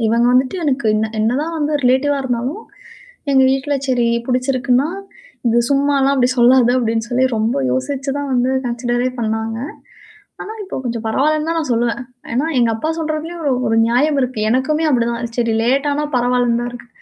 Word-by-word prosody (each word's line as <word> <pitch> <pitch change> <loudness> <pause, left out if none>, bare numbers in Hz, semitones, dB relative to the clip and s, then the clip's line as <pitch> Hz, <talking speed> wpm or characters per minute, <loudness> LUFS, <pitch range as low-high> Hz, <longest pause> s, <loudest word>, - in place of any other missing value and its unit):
இவங்க 235 +2 +2
வந்துட்டு 255 +7 +2
எனக்கு 275 -4 0
என்ன 215 +1 0
என்னதான் 265 +10 0
வந்து 300 0 -1
ரிலேட்டிவ்வா 265 +3 +2
இருந்தாலும், 260 - -3 0.7
எங்க 265 -1 +5
வீட்ல 270 +2 0
சரி 245 -3 +1 0.2
புடிச்சிருக்குன்னா 255 +2 +1 0.6
இது 235 +1 +3
சும்மாலாம் 275 0 +2
அப்படி 250 -2 +2
சொல்லாத 245 0 +5
அப்படின்னுசொல்லி 235 +2 0
ரொம்ப 220 -2 0 0.2
யோசிச்சு 275 - -2
தான் 285 -1 -4
வந்து 250 0 +2 0.2
கன்சிடரே 240 +1 -1
பண்ணாங்க. 220 0 -2 0.8
ஆனா, 430 - -7
இப்போ 380 - -6
கொஞ்சம் 235 -3 -4
பரவால்லன்னு 300 +7 +1
தான் 330 - 0
நான் 305 -6 -3
சொல்லுவேன். 235 +2 0 0.3
ஏன்னா 260 +6 0
எங்க 235 -2 +3
அப்பா 265 +8 -3
சொல்றதுலேயும் 320 +2 -4
ஒரு 280 - +2 0.2
ஒரு 225 - +1
நியாயம் 280 +5 +2
இருக்கு. 250 -3 -2
எனக்குமே 300 +6 +1
அப்படிதான். 235 -3 +1 0.2
சரி 230 -2 +1
லேட்டானா 285 +4 +1
பரவால்லன்னு 245 -1 +1
தான் 240 0 -3
இருக்கு. 240 -1 -11
255 Hz, 160 wpm, -18 LUFS, 235-285 Hz, 0.8 s, எங்க